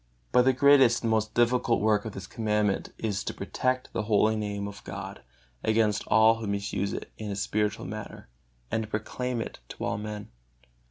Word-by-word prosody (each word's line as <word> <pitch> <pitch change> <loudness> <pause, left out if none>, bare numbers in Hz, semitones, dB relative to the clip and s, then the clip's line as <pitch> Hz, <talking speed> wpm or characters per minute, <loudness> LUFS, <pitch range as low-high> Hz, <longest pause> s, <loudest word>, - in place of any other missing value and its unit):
But 125 0 +5
the 130 - +6
greatest 135 -3 +5
and 115 - +1
most 110 0 0
difficult 120 0 +3
work 105 0 +2
of 110 - -5
this 95 - -7
Commandment 105 -2 0
is 105 -3 -2
to - - -4
protect 130 0 -2
the - - 0
holy 110 0 +3
Name 105 -1 -3
of 100 -1 -9
God - - -7 0.4
against 110 -2 +2
all 110 +1 +5
who 110 -2 -5
misuse 100 0 -1
it - - -6
in 110 -1 -4
a 100 - -2
spiritual 105 +1 -1
manner, - - -7 0.4
and 110 - +1
to 110 - -6
proclaim 120 +3 -2
it - - -6
to - - -5
all 100 - -1
men. 105 -3 -6
110 Hz, 185 wpm, -28 LUFS, 105-115 Hz, 0.4 s, the